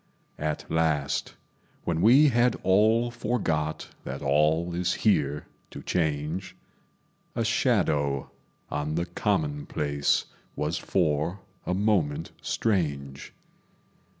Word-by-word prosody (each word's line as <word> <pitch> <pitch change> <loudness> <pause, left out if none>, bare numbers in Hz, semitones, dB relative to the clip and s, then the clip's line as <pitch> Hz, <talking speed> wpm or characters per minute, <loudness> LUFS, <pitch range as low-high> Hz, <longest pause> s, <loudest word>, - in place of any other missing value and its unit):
At 75 0 -2
last, 80 -3 0 0.5
when 85 -1 -1
we 135 - +7
had 120 -1 +3
all 110 +5 +4
forgot 95 -10 -1
That 70 +2 -6
all 75 +5 +2
is 90 +1 0
here 75 -8 +2 0.2
to - - -9
change, 80 +2 -1 0.8
A 115 -1 0
shadow 85 - +1 0.4
on 75 +1 -2
the 85 +1 0
commonplace 100 - 0 0.3
Was 75 +3 -1
for 85 +1 0 0.3
a 90 - +1
moment 90 -7 +1
strange. 70 -10 -1
85 Hz, 95 wpm, -27 LUFS, 75-105 Hz, 0.8 s, we